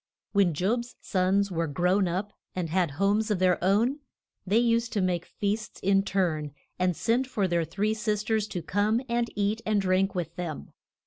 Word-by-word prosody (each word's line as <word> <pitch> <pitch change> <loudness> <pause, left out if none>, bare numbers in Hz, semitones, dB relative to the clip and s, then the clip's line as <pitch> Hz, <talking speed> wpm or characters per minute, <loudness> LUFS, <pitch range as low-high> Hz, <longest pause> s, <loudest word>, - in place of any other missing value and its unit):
When 195 -6 +3
Job's 235 +9 -1
sons 195 +1 +1
were 165 -1 -1
grown 180 +6 +2
up 190 +4 -3 0.2
and 175 -4 -2
had 180 -2 +2
homes 205 +4 +2
of 210 - +1
their 180 -1 +2
own, 225 +10 +2 0.5
they 205 +4 +3
used 230 0 +2
to 210 - +1
make 180 -2 -1
feasts 210 +1 -3
in 195 0 +3
turn, 160 -7 -1 0.2
and 180 -1 +2
send 245 +3 +1
for 205 -7 0
their 170 -2 +1
three 205 +7 -1
sis 210 -1 -1
ters 215 -1 0
to 180 -5 -5
come 205 +7 +1
and 235 0 0
eat 205 +2 0
and 215 -1 +1
drink 190 0 +1
with 170 -2 -3
them. 170 -5 -5
195 Hz, 185 wpm, -27 LUFS, 180-215 Hz, 0.5 s, When